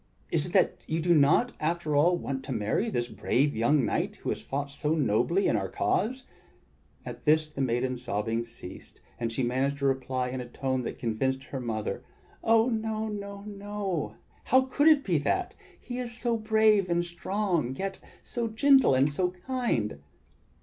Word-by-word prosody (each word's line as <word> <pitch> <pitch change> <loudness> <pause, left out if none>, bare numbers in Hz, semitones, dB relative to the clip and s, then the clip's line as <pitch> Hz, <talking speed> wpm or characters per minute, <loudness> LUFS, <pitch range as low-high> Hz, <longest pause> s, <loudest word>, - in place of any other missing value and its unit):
Is - - +1
it - - -9
that - - +2
you 160 - -1
do 175 +1 +3
not, 160 - +4
after 160 -1 -1
all, 170 +5 +4
want 135 -5 -4
to - - -6
marry 115 - 0
this 120 - -1
brave 140 +3 0
young 120 +4 +3
knight - - -1
who - - -5
has - - -2
fought 140 +1 -4
so 150 +2 -1
nobly 155 - +2
in - - +2
our 95 -2 -1
cause?" 255 +5 0 0.8
At - - -8
this 155 0 +4
the 150 -2 -6
maiden's 125 0 0
sobbing 115 0 -1
ceased, 115 -5 -12 0.2
and 115 -1 -1
she 120 +3 -1
managed 130 +3 0
to 140 - -2
reply 130 -1 0
in 130 0 -4
a 120 - -9
tone 130 0 -1
that - - -4
convinced 130 +3 -1
her 135 - -6
mother: 110 -4 -3 0.4
"Oh! 225 +1 +4
no, 220 -2 -2
no, 200 -1 -6
no. 205 -4 -4 0.3
How 260 - +5
could 260 +3 +1
it 305 -3 +6
be 175 -5 +1
that? 370 - -1 0.3
He 245 0 -6
is 240 -2 -5
so 240 -1 0
brave 220 -3 +3
and 175 0 +1
strong, 175 - -1
yet 195 +4 -4 0.2
so 235 -1 -2
gentle 265 - +5
and 135 +2 +4
so 180 +4 +1
kind!" 180 - -2
160 Hz, 180 wpm, -28 LUFS, 130-215 Hz, 0.8 s, it